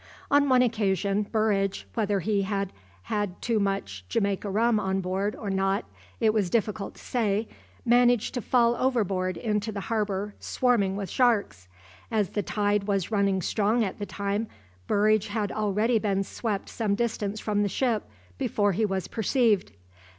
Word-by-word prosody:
On 285 Hz, 0 st, +4 dB
one 255 Hz, -1 st, +5 dB
occasion, 200 Hz, -3 st, 0 dB
Burridge, 205 Hz, -3 st, +1 dB
whether 205 Hz, -3 st, 0 dB
he 200 Hz, +3 st, +1 dB
had 195 Hz, -1 st, -2 dB, 0.3 s
had 205 Hz, -4 st, -2 dB
too 230 Hz, -3 st, 0 dB
much 150 Hz, -, -2 dB
Jamaica 200 Hz, -2 st, 0 dB
rum 220 Hz, +2 st, +2 dB
on 190 Hz, -1 st, 0 dB
board 190 Hz, +3 st, -1 dB
or 205 Hz, -3 st, -4 dB
not 195 Hz, -, 0 dB, 0.3 s
it 215 Hz, -1 st, +3 dB
was 205 Hz, -5 st, +1 dB
difficult 210 Hz, -1 st, -1 dB
to -, -, -15 dB
say, 220 Hz, -3 st, 0 dB, 0.4 s
managed 245 Hz, -1 st, +4 dB
to 250 Hz, -, -2 dB
fall 235 Hz, 0 st, +3 dB
overboard 195 Hz, -8 st, 0 dB
into 210 Hz, +4 st, -1 dB
the 205 Hz, -, -4 dB
harbour 205 Hz, -1 st, -2 dB
swarming 220 Hz, -7 st, +1 dB
with 200 Hz, -1 st, -4 dB
sharks. 210 Hz, -, +1 dB, 0.4 s
As 215 Hz, -4 st, +1 dB
the 205 Hz, -, -1 dB
tide 205 Hz, +1 st, 0 dB
was 195 Hz, -1 st, -1 dB
running 200 Hz, -3 st, +1 dB
strong 220 Hz, +2 st, +1 dB
at 195 Hz, -1 st, -4 dB
the 205 Hz, -, -4 dB
time, 200 Hz, +2 st, -2 dB, 0.4 s
Burridge 215 Hz, 0 st, +3 dB
had 205 Hz, 0 st, -2 dB
already 215 Hz, +2 st, +1 dB
been 195 Hz, -2 st, 0 dB
swept 205 Hz, 0 st, -3 dB
some 210 Hz, -3 st, -1 dB
distance 215 Hz, -2 st, -2 dB
from 210 Hz, -1 st, 0 dB
the 205 Hz, -, +1 dB
ship 225 Hz, -, 0 dB, 0.3 s
before 205 Hz, -1 st, +1 dB
he 215 Hz, +4 st, +1 dB
was 190 Hz, -2 st, -2 dB
perceived. 225 Hz, -2 st, +1 dB
205 Hz, 160 wpm, -27 LUFS, 195-225 Hz, 0.4 s, one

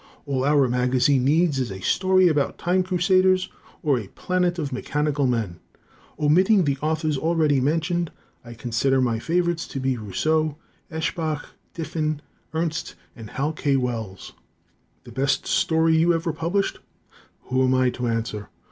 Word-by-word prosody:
All 135 Hz, -3 st, -1 dB
our 140 Hz, -1 st, +4 dB
magazine 125 Hz, +2 st, +2 dB
needs 155 Hz, 0 st, +3 dB
is 125 Hz, -5 st, -2 dB
a 95 Hz, -, -6 dB
story 185 Hz, -, +3 dB
about 150 Hz, -4 st, +1 dB
time 180 Hz, +2 st, +1 dB
crusaders, 185 Hz, +1 st, +2 dB, 0.3 s
or 140 Hz, -5 st, +2 dB
a 105 Hz, -, -8 dB
planet 180 Hz, -, -1 dB
of 145 Hz, -5 st, -3 dB
mechanical 145 Hz, +1 st, 0 dB
men. 110 Hz, -8 st, -2 dB, 0.6 s
Omitting 185 Hz, +7 st, +4 dB
the 140 Hz, -3 st, 0 dB
authors 155 Hz, -2 st, 0 dB
already 155 Hz, -3 st, +2 dB
mentioned, 165 Hz, +4 st, 0 dB, 0.3 s
I 120 Hz, -1 st, -10 dB
considered 125 Hz, +3 st, +1 dB
my 115 Hz, -3 st, 0 dB
favorites 170 Hz, +4 st, 0 dB
to 135 Hz, -, -5 dB
be 130 Hz, -1 st, 0 dB
Rousseau, 155 Hz, +8 st, 0 dB, 0.3 s
Eshbach, 160 Hz, -1 st, -2 dB, 0.3 s
Diffin, 155 Hz, -2 st, -2 dB, 0.3 s
Ernst, 160 Hz, 0 st, -2 dB, 0.2 s
and 110 Hz, -3 st, -10 dB
Hal 145 Hz, +7 st, -2 dB
K. 145 Hz, -2 st, 0 dB
Wells. 115 Hz, -7 st, -3 dB, 0.7 s
The -, -, -12 dB
best 135 Hz, 0 st, 0 dB
story 165 Hz, -4 st, +2 dB
you 170 Hz, +1 st, +4 dB
ever 165 Hz, 0 st, -2 dB
published? 170 Hz, +5 st, -1 dB, 0.6 s
Who 130 Hz, +1 st, 0 dB
am 130 Hz, 0 st, +3 dB
I 130 Hz, -1 st, +3 dB
to 125 Hz, -1 st, -3 dB
answer? 115 Hz, -2 st, -3 dB
150 Hz, 145 wpm, -24 LUFS, 130-165 Hz, 0.7 s, our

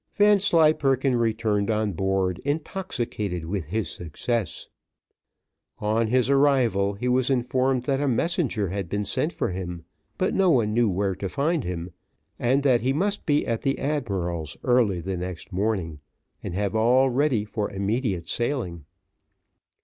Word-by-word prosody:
Vanslyperken 155 Hz, -, +4 dB
returned 110 Hz, -3 st, 0 dB
on 110 Hz, -1 st, +1 dB
board 95 Hz, -1 st, 0 dB
intoxicated 125 Hz, -, -3 dB
with 90 Hz, 0 st, -3 dB
his 105 Hz, +7 st, -2 dB
success. 95 Hz, +6 st, -3 dB, 1.1 s
On 110 Hz, +2 st, 0 dB
his 125 Hz, +1 st, +2 dB
arrival, 130 Hz, -8 st, +3 dB
he 125 Hz, +5 st, -3 dB
was 125 Hz, +1 st, +2 dB
informed 130 Hz, 0 st, +1 dB
that 135 Hz, +1 st, 0 dB
a 145 Hz, -, +1 dB
messenger 130 Hz, -, 0 dB
had 95 Hz, -1 st, -4 dB
been 105 Hz, +3 st, -1 dB
sent 135 Hz, -, 0 dB
for -, -, -2 dB
him, 90 Hz, -2 st, -6 dB, 0.3 s
but 185 Hz, -, 0 dB
no 190 Hz, -2 st, +3 dB
one 115 Hz, -9 st, +3 dB
knew 115 Hz, -1 st, +3 dB
where 95 Hz, +1 st, 0 dB
to 95 Hz, +1 st, -5 dB
find 150 Hz, -, 0 dB
him, 90 Hz, 0 st, -5 dB, 0.5 s
and 130 Hz, +4 st, +2 dB
that 130 Hz, -4 st, +4 dB
he 130 Hz, +3 st, +1 dB
must 200 Hz, +7 st, -1 dB
be 145 Hz, -1 st, +2 dB
at 115 Hz, -1 st, -1 dB
the 135 Hz, -, 0 dB
admiral's 95 Hz, -, -2 dB
early 115 Hz, -8 st, +2 dB
the 95 Hz, +2 st, -3 dB
next 90 Hz, +2 st, -6 dB
morning, 95 Hz, -6 st, -1 dB, 0.4 s
and 85 Hz, -, -5 dB
have 100 Hz, -1 st, -1 dB
all 125 Hz, +4 st, +4 dB
ready 130 Hz, -5 st, +1 dB
for 105 Hz, -1 st, -3 dB
immediate 100 Hz, -2 st, -2 dB
sailing. 115 Hz, -, -2 dB
115 Hz, 150 wpm, -25 LUFS, 95-135 Hz, 1.1 s, Vanslyperken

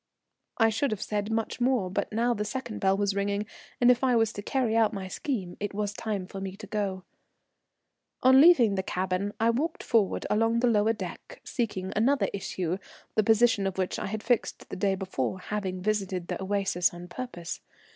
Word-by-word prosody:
I 225 Hz, -1 st, +5 dB
should 245 Hz, +6 st, 0 dB
have 215 Hz, -3 st, -3 dB
said 210 Hz, 0 st, -2 dB
much 225 Hz, +2 st, -2 dB
more, 245 Hz, -6 st, +2 dB
but -, -, -2 dB
now 235 Hz, +3 st, +2 dB
the 210 Hz, -2 st, -2 dB
second 225 Hz, +1 st, -5 dB
bell 195 Hz, -1 st, +2 dB
was 200 Hz, -1 st, +1 dB
ringing, 200 Hz, +1 st, -1 dB, 0.3 s
and 245 Hz, 0 st, +7 dB
if 250 Hz, +1 st, +1 dB
I 255 Hz, -2 st, +4 dB
was 225 Hz, -1 st, +2 dB
to 205 Hz, -, -5 dB
carry 235 Hz, 0 st, 0 dB
out 225 Hz, -1 st, +3 dB
my 195 Hz, -2 st, -4 dB
scheme 190 Hz, -3 st, -3 dB
it 205 Hz, -1 st, -4 dB
was 210 Hz, 0 st, -1 dB
time 205 Hz, -3 st, -3 dB
for 195 Hz, +1 st, -8 dB
me 190 Hz, -1 st, -5 dB
to 215 Hz, -, -9 dB
go. 195 Hz, -2 st, -2 dB, 1.2 s
On 260 Hz, +1 st, +8 dB
leaving 275 Hz, -11 st, +7 dB
the 190 Hz, -, 0 dB
cabin 185 Hz, +2 st, -1 dB
I 225 Hz, +1 st, +4 dB
walked 305 Hz, +8 st, -2 dB
forward 215 Hz, -4 st, +1 dB
along 225 Hz, +2 st, +2 dB
the -, -, +3 dB
lower 220 Hz, -1 st, +3 dB
deck 190 Hz, -6 st, -8 dB
seeking 200 Hz, -6 st, -3 dB
another 265 Hz, +6 st, +2 dB
issue, 185 Hz, -2 st, -2 dB, 0.3 s
the 215 Hz, -, +3 dB
position 220 Hz, -2 st, +4 dB
of 190 Hz, -, -4 dB
which 185 Hz, -1 st, -1 dB
I -, -, -3 dB
had 215 Hz, +2 st, -4 dB
fixed 240 Hz, -2 st, 0 dB
the -, -, -5 dB
day 195 Hz, +1 st, +1 dB
before, 185 Hz, -5 st, -2 dB
having 185 Hz, -2 st, -4 dB
visited 195 Hz, -4 st, -1 dB
the -, -, -3 dB
Oasis 195 Hz, -3 st, +1 dB
on 175 Hz, +1 st, -9 dB
purpose. 175 Hz, -6 st, -6 dB
205 Hz, 195 wpm, -28 LUFS, 190-230 Hz, 1.2 s, On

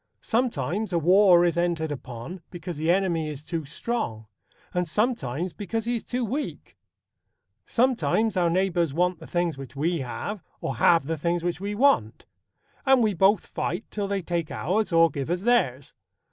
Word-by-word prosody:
Sometimes 215 Hz, -, -1 dB
a 175 Hz, -, +1 dB
war 180 Hz, +1 st, +6 dB
is 170 Hz, -1 st, +1 dB
entered 170 Hz, -3 st, 0 dB
upon 130 Hz, +5 st, -7 dB
because 175 Hz, -2 st, -7 dB
the 160 Hz, +2 st, -1 dB
enemy 175 Hz, -4 st, +1 dB
is 150 Hz, -1 st, -7 dB
too 165 Hz, -1 st, -4 dB
strong, 140 Hz, -, -3 dB, 0.5 s
and 180 Hz, -1 st, 0 dB
sometimes 175 Hz, -, -1 dB
because 220 Hz, +2 st, -3 dB
he 240 Hz, +1 st, 0 dB
is 230 Hz, -, -4 dB
too 250 Hz, -1 st, -2 dB
weak. 275 Hz, +8 st, -5 dB, 0.9 s
Sometimes 230 Hz, -3 st, +1 dB
our 175 Hz, -2 st, +2 dB
neighbours 175 Hz, -4 st, +1 dB
want 180 Hz, 0 st, +1 dB
the 160 Hz, -, -11 dB
things 175 Hz, -5 st, -1 dB
which 135 Hz, -1 st, -9 dB
we 165 Hz, +4 st, 0 dB
have, 165 Hz, -, -5 dB, 0.2 s
or 130 Hz, -, -4 dB
have 165 Hz, +1 st, +4 dB
the 160 Hz, +1 st, -3 dB
things 170 Hz, +2 st, 0 dB
which 175 Hz, +1 st, -2 dB
we 205 Hz, +1 st, -3 dB
want; 275 Hz, +5 st, +2 dB, 0.6 s
and 265 Hz, -3 st, +5 dB
we 215 Hz, -2 st, +2 dB
both 195 Hz, +2 st, +3 dB
fight 175 Hz, -, -3 dB
till 205 Hz, -1 st, -2 dB
they 195 Hz, -2 st, -2 dB
take 170 Hz, -2 st, -2 dB
ours 205 Hz, +6 st, -1 dB
or 165 Hz, -1 st, +5 dB
give 140 Hz, +1 st, -4 dB
us 175 Hz, +1 st, -1 dB
theirs. 145 Hz, -, +1 dB
175 Hz, 175 wpm, -26 LUFS, 160-205 Hz, 0.9 s, war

